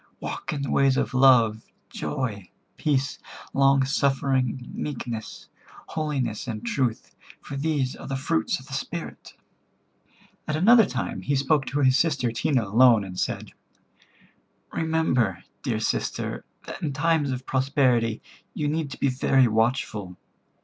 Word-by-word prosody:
Walk - - -5
in 145 -2 -3
the 135 - -3
ways 135 -1 +3
of - - -1
love, 120 -5 +5 0.3
joy, 110 -10 -4 0.3
peace, 140 -2 0 0.3
long 135 0 +4
suffering, 135 -2 0
meekness, 120 -6 -5 0.4
holiness 140 -8 -2
and 110 -1 -5
truth, 120 -1 -2 0.2
for 140 - -8
these 140 -3 -1
are - - -10
the 135 - -2
fruits 130 -10 0
of 130 - -14
the 140 - -11
Spirit." 165 +5 -6 1.1
At 155 - -1
another 220 +6 +6
time 130 0 -3
he 140 - 0
spoke 135 0 +1
to 145 +2 -1
his 130 -1 +4
sister 145 -7 +1
Tena 120 +1 0
alone, 115 +1 +5
and 90 -1 -7
said: - - -3 1.2
"Remember, 130 - 0 0.2
dear 110 -1 -1
sister, 110 - -2 0.2
that - - -8
in 150 -4 -2
times 155 0 +1
of 130 0 -4
prosperity 130 -4 +1 0.3
you 150 - -1
need 155 0 -1
to 140 - -9
be 140 - +2
very 130 0 +3
watchful. 110 -4 -1
130 Hz, 140 wpm, -25 LUFS, 120-145 Hz, 1.2 s, another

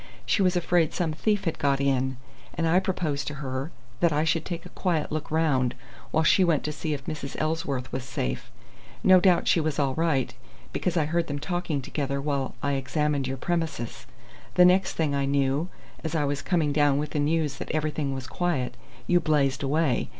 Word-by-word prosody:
She - - +2
was 185 -1 +3
afraid 175 -2 +2
some 165 -4 0
thief 205 +5 0
had 165 - -1
got 140 -1 +2
in, 130 -1 +1 0.4
and 165 - 0
I 170 +3 +5
proposed 160 -7 -2
to 150 - -3
her 135 0 -4 0.3
that 170 -1 +3
I 150 +1 +2
should 160 0 +1
take 170 -2 -5
a - - -9
quiet 170 -5 -1
look 155 0 -3
round 145 -6 +1 0.3
while 160 - +2
she 185 +4 +5
went 165 -5 +2
to 150 - -2
see 150 0 -2
if 135 -1 -9
Mrs. 150 -3 -5
Ellsworth 155 -5 -2
was 130 - -3
safe. 125 - -3 0.5
No 185 -1 +7
doubt 180 -1 +3
she - - +4
was 155 -2 -1
all 140 -2 +1
right, 140 -5 +1 0.4
because 180 -1 -1
I 155 - +3
heard 170 +2 0
them 145 - -3
talking 165 -2 -2
together 140 0 -2
while 140 -2 -2
I 140 - +1
examined 140 +1 0
your 135 +1 -3
premises. 160 -6 -3 0.5
The 180 - +7
next 185 +2 +4
thing 155 -3 0
I 140 -1 +1
knew, 140 +4 +1 0.3
as 160 0 -3
I 150 -2 +2
was 145 0 -1
coming 160 -5 +1
down 145 -1 +3
with 150 +1 -2
the 150 - -1
news 150 0 +1
that - - -6
everything 155 -2 -1
was 130 -1 -4
quiet, 145 -5 -1 0.3
you 175 - +4
blazed 140 -5 +1
away. 145 0 +1
150 Hz, 200 wpm, -26 LUFS, 140-165 Hz, 0.5 s, No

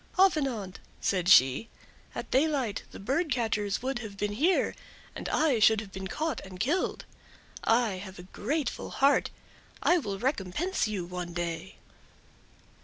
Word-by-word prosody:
"Avenant," 270 - +2 0.2
said 180 -2 0
she, 135 - +6 0.5
"at - - -6
daylight 265 -6 +1
the - - -10
bird 280 - 0
catchers 220 -3 0
would 265 -1 -1
have 215 -4 -8
been 205 +1 -1
here, 325 - +2 0.4
and - - -4
I 295 -7 +2
should 220 0 +6
have 210 -3 -8
been 190 0 -5
caught 315 +10 -2
and 185 -1 -10
killed. 300 - 0 0.6
I 225 -4 +2
have 190 0 -9
a 180 - -9
grateful 270 - -3
heart; 275 +1 +3 0.5
I 355 - +5
will 200 -9 -4
recompense 260 - -1
you 200 -5 -3
one 175 -1 -5
day." 170 - -4
220 Hz, 145 wpm, -29 LUFS, 190-275 Hz, 0.6 s, she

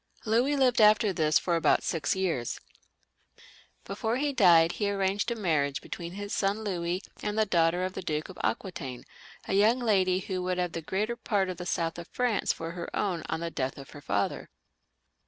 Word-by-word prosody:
Louis 240 +6 +2
lived 255 -4 +3
after 210 -1 +5
this 155 -2 +3
for 175 - 0
about 165 - +3
six 160 0 -1
years. 170 -11 -1 1.3
Before 220 +4 -2
he 285 +1 0
died 170 -8 +6
he 205 +1 -1
arranged 195 +2 0
a 235 - -1
marriage 155 -9 0
between 170 0 -7
his 205 +1 -5
son 200 +2 0
Louis 180 -2 -2 0.2
and 210 +1 -3
the 220 - +3
daughter 175 -1 +2
of 185 - -4
the - - -5
Duke 155 -3 -2
of 185 - -11
Aquitaine, 135 - -3 0.4
a - - -2
young 215 +5 +4
lady 195 -7 +2
who 185 -1 -3
would 180 0 -1
have 180 -1 -1
the 165 - -4
greater 210 +8 -2
part 200 -5 0
of 185 - -5
the 180 - -6
south 165 -1 -1
of 170 - -8
France 245 -4 0
for 165 0 -5
her 170 0 -6
own 185 -5 -1
on 165 - -2
the 170 0 -3
death 130 -3 -3
of 135 -1 -11
her 145 - -11
father. 100 -6 -2
185 Hz, 195 wpm, -28 LUFS, 165-210 Hz, 1.3 s, died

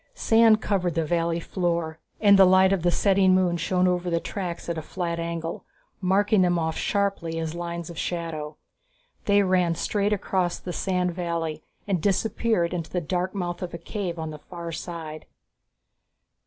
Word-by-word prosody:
Sand 225 - +4
covered 180 -5 0
the 165 -1 +1
valley 170 +1 0
floor, 170 -3 -2 0.2
and 200 -2 +6
the - - +10
light 185 +1 +5
of 195 - 0
the 175 - +2
setting 190 0 +4
moon 180 -2 +2
shone 180 +2 +1
over 180 0 0
the 170 -1 +1
tracks 180 -2 -5
at 170 - -2
a - - -5
flat 170 +1 -3
angle, 165 0 -4 0.4
marking 200 +2 +3
them 175 -1 +3
off 160 -1 -1
sharply 195 -5 -1
as 160 -1 -3
lines 170 -1 -5
of 170 -2 -7
shadow. 160 -3 -4 0.7
They 200 0 +4
ran 180 -3 +2
straight 205 +4 0
across 185 -3 0
the 180 - -6
sandy 180 -2 0
valley 165 -3 -3 0.3
and 190 -5 0
disappeared 200 -1 +1
into 170 -3 -4
the 180 - -1
dark 180 +3 -2
mouth 175 -2 -3
of 180 -2 -5
a - - -4
cave 175 0 -4
on 160 -1 -4
the 150 - -9
far 170 +2 -7
side. 160 -2 -7
175 Hz, 175 wpm, -25 LUFS, 170-190 Hz, 0.7 s, the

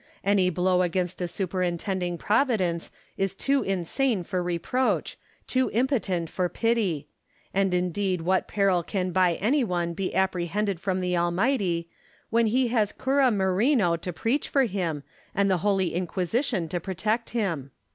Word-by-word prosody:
Any 195 -2 +3
blow 180 +1 +2
against 180 0 -1
a 175 - 0
superintending 180 0 -2
Providence 205 -7 +1 0.3
is 195 0 -1
too 275 +6 +1
insane 195 +4 0
for 185 +1 -2
reproach, 180 +9 0 0.3
too 260 0 +1
impotent 220 - +1
for 180 +2 -1
pity: 205 -12 0 0.5
and 195 -1 +2
indeed 180 0 0
what 185 +3 +1
peril 195 -3 +2
can 185 +1 -2
by 180 -2 +3
any 260 - +2
one 175 -5 -1
be 185 +2 -3
apprehended 190 +1 0
from 185 0 -1
the 180 0 0
Almighty, 175 0 +1 0.4
when 230 0 +3
he 250 +2 +2
has 220 -4 +1
Cura 270 0 +2
Merino 195 - +2
to 175 +2 -5
preach 230 - -1
for 275 - +3
him, 180 - -2 0.3
and 200 0 +2
the 185 - +3
Holy 195 -3 +1
Inquisition 185 - -1
to 175 - -2
protect 210 +6 -2
him 235 - -2
1 160 - -3
Merino. 135 - -15
190 Hz, 155 wpm, -26 LUFS, 175-220 Hz, 0.5 s, Any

